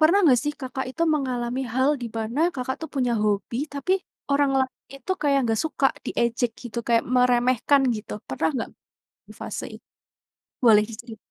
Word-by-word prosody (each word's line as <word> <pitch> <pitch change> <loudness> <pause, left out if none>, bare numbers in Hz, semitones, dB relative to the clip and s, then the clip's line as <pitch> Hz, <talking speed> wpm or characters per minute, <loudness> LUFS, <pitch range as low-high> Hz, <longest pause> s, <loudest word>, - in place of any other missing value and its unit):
pernah 325 +6 +5
nggak 255 -6 +6
sih 295 - 0
Kakak 265 0 -4
itu 330 +6 -3
mengalami 255 -2 -2
hal 260 +2 +3
di - - -2
pana 225 +5 -2
Kakak 260 0 -3
tuh 320 - -6
punya 250 -3 +1
hobi 210 +2 0 0.2
tapi 285 +7 0 0.4
orang 280 0 +3
lain 260 -1 +1 0.2
itu 275 +7 -3
kayak 280 -2 +3
nggak 225 -1 +1
suka, 290 -3 +2 0.2
diejek 235 0 0
gitu 240 -1 -5
kayak 230 -1 +3
meremehkan 250 +2 +3
gitu? 215 - -8 0.2
Pernah 135 +4 0
nggak 245 - -3 0.6
di - - -12
fase - - -5
i - - -10 0.9
boleh 215 -3 +7
diceri 225 +1 -9
250 Hz, 170 wpm, -24 LUFS, 235-275 Hz, 0.9 s, boleh